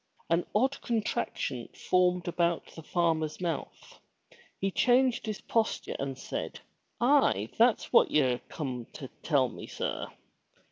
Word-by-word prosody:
'* - - -34
An 170 +1 +2
odd 265 +6 +2
contraction 225 -3 -2
formed 180 -1 +2
about 170 -1 +1
the 160 - -9
farmer's 160 -2 0
mouth. 170 -5 -5 0.6
He 195 0 0
changed 245 +2 +3
his 215 -2 -3
posture 225 -1 -1
and 135 -1 -3
said, - - -5 0.4
Aye, 240 - +3
that's 235 0 +3
what - - +6
ye're 130 -5 +2
come 125 -6 -4
to 135 -4 -8
tell 140 -5 +3
me, 120 - -9
sir! - - -3
175 Hz, 135 wpm, -30 LUFS, 145-220 Hz, 0.6 s, what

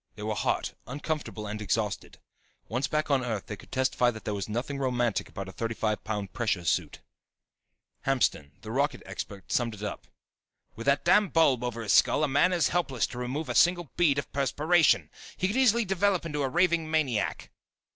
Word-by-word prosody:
They 105 - -8
were 110 0 -1
hot, 105 - -1
uncomfortable 145 -4 -4
and 105 +1 -5
exhausted. 105 +1 -2 0.5
Once 125 +4 -1
back 155 -1 -1
on 135 -2 +3
Earth 110 -7 -3
they - - -6
could - - -17
testify 130 -1 +2
that 110 -3 -7
there 105 - -1
was 100 0 -4
nothing 130 +6 -3
romantic 120 -4 0
about 100 -1 -6
a - - -7
thirty 115 +3 -3
five 110 -1 -1
pound 105 -3 -4
pressure 100 -7 -1
suit. 75 - -1 1.1
Hamston, 125 - +1
the 110 - -7
rocket 140 +1 0
expert, 100 0 -7
summed 115 -3 0
it 105 - -10
up: 105 - -5 0.7
"With 115 +4 -7
that 140 +3 +3
damn 200 +3 +5
bulb 140 -7 +3
over 115 -2 -3
his 105 - +1
skull 150 - +4
a - - +3
man 145 +6 +3
is 175 -4 +2
helpless 140 -10 0
to 120 - -7
remove 130 +6 -3
a - - -2
single 175 -5 +3
bead 155 -6 +3
of 140 - -4
perspiration. 150 +5 +3 0.3
He - - -1
could 200 +4 0
easily 235 -3 +4
develop 195 -1 +1
into 150 -3 -2
a 135 - 0
raving 170 0 +2
maniac." 150 -8 -1
130 Hz, 195 wpm, -28 LUFS, 110-155 Hz, 1.1 s, damn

